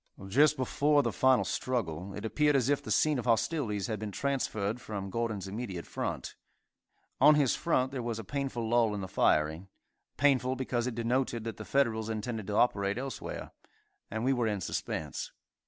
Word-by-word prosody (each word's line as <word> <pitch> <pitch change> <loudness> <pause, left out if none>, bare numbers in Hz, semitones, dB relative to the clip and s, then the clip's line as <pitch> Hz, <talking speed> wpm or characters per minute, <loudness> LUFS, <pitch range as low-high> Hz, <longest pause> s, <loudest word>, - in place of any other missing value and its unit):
Just 150 +7 +4
before 145 +3 +2
the - - 0
final 130 -6 +3
struggle, 95 -6 -2
it 105 - -6
appeared 150 +5 +2
as 130 -1 +2
if 145 0 +2
the - - -9
scene 150 -3 +3
of 120 - -5
hostilities 115 - +1
had 110 -3 -3
been 105 -1 -4
transferred 125 -3 -1
from 100 -3 -5
Gordon's 110 -4 -2
immediate 95 -4 -5
front. - - -4 0.9
On 150 +3 +7
his 145 -4 +3
front 130 -6 +1
there 135 -2 -3
was 120 -2 -3
a 115 - -5
painful 130 0 -3
lull 115 -2 +3
in 100 - -4
the 95 - -4
firing; 80 0 +1 0.5
painful 130 -2 +3
because 125 -2 -1
it 125 - -3
denoted 120 0 0
that 115 -3 -5
the - - -7
Federals 115 -5 +1
intended 110 -1 -3
to 105 - -2
operate 100 -3 +2
elsewhere, 135 +1 -5 0.6
and 110 +3 -3
we 135 - +3
were 120 -3 +1
in 105 -2 -1
suspense. 75 -4 -4
115 Hz, 180 wpm, -30 LUFS, 105-130 Hz, 0.9 s, On